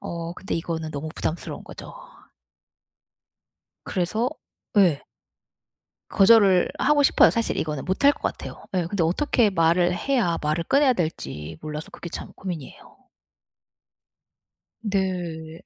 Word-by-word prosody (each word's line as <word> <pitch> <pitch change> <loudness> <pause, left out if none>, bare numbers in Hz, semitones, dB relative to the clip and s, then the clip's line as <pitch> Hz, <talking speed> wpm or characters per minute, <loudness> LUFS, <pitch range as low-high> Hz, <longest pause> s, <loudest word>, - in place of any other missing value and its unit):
어. 170 0 -5
근데 190 +3 -5
이거는 165 -1 -3
너무 145 +2 -5
부담스러운 160 - -4
거죠. - - -10 1.9
그래서 215 +7 -1 0.5
예. 175 -8 +4 1.1
거절을 195 -3 +5
하고 290 0 +3
싶어요. - - +6
사실 230 -1 -1
이거는 150 -3 -2
못할 235 +11 +4
것 - - -13
같아요. - - -5
예 180 -2 +1
근데 175 0 -1
어떻게 220 - +2
말을 175 0 +2
해야 225 -5 0
말을 155 +2 0
꺼내야 275 -2 +4
될지 80 - -4
몰라서 150 0 -6
그게 170 - -8
참 - - -7
고민이에요. 170 -8 -8 1.9
네. 180 -6 -3
175 Hz, 255 characters per minute, -24 LUFS, 160-205 Hz, 1.9 s, 싶어요